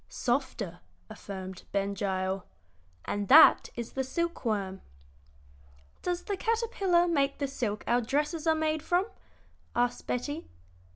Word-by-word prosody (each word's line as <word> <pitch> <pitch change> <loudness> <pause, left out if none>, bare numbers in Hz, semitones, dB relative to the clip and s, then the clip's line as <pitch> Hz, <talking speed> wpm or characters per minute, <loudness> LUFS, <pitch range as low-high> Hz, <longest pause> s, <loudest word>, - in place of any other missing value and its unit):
"Softer," 240 -9 -2 0.3
affirmed 190 -2 -7
Ben 200 0 0
Gile; 190 -1 -2 0.6
"and 205 -1 -2
that 310 +8 +8
is 235 -1 -5
the 265 - -1
silk 340 +6 -2
worm." 200 -5 -2 1.2
"Does 355 -1 -2
the 405 - -2
caterpillar 395 -5 +1
make 280 -5 +1
the 280 - -1
silk 230 -6 -3
our 240 +1 +2
dresses 300 +6 -1
are 320 - +5
made 315 -1 0
from?" 355 +4 +1 0.7
asked 245 0 0
Betty. 290 +6 -3
265 Hz, 125 wpm, -29 LUFS, 205-320 Hz, 1.2 s, that